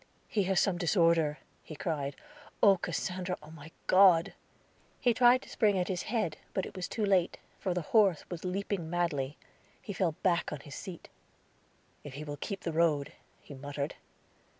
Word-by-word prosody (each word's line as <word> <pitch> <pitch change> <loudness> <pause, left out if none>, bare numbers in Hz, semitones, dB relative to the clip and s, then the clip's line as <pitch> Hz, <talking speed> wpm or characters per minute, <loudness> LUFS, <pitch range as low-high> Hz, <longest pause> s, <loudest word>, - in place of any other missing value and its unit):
"He 205 -3 0
has 190 -1 +2
some 180 -3 +1
disorder," 165 -4 +3 0.2
he 155 - -10
cried. 145 -3 -3 0.5
"Oh, 200 -2 +7
Cassandra! 180 +1 -3 0.2
My 155 -1 -11 0.2
God!" 185 -3 +6 0.7
He 245 -2 +3
tried 245 +2 +5
to - - -14
spring 210 -4 +2
at 180 +1 -1
his 180 -2 -1
head, 210 -9 -1 0.2
but 190 - -2
was 185 -1 -3
too 220 - -1
late, 190 -3 +2 0.2
for 185 -3 -1
the 180 - -1
horse 200 -8 +4
was 175 -2 -7
leaping 185 -2 -2
madly. 155 -5 -1 0.4
He 205 - -7
fell 180 -3 0
back 175 -2 +2
on 150 -2 -5
his 145 - -11
seat. 185 0 -8 1.0
"If 140 -2 -9
he 150 - -6
will 145 -1 -6
keep 195 +6 -5
the 170 - -3
road," 155 -3 +2 0.3
he - - -11
muttered. 140 +1 -4
175 Hz, 170 wpm, -31 LUFS, 155-195 Hz, 1.0 s, Oh